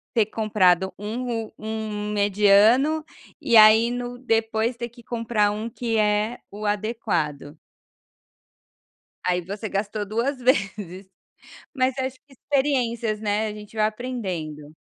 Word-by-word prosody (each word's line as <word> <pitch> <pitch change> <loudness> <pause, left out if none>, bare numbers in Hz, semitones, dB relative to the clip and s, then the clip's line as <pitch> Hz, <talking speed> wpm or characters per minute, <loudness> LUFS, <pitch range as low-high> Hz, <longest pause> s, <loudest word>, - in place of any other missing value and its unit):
ter 220 -3 +3
comprado 190 -4 +2
um 225 +1 -3
um 215 -1 -4
mediano 210 +9 +4 0.4
e 235 -5 +4
aí, 220 +2 +7
no 245 0 -5
depois 225 -1 0
ter 235 0 -5
que 240 +1 -16
comprar 230 -3 0
um 215 +2 -4
que 230 -1 -2
é 210 +2 +1
o 210 +1 -7
adequado. 175 -9 -2 1.7
Aí, 180 0 +1
você 200 +5 -6
gastou 205 +1 -2
2 235 +7 -1
vezes. 200 -6 -1 0.7
Mas 260 -1 +1
acho 260 0 -2
que 280 - -22
experiências, 245 -6 -1
né? 210 0 0
A 210 - -4
gente 210 +1 -12
vai 215 - +3
aprendendo. 185 -11 -5
215 Hz, 125 wpm, -24 LUFS, 205-235 Hz, 1.7 s, aí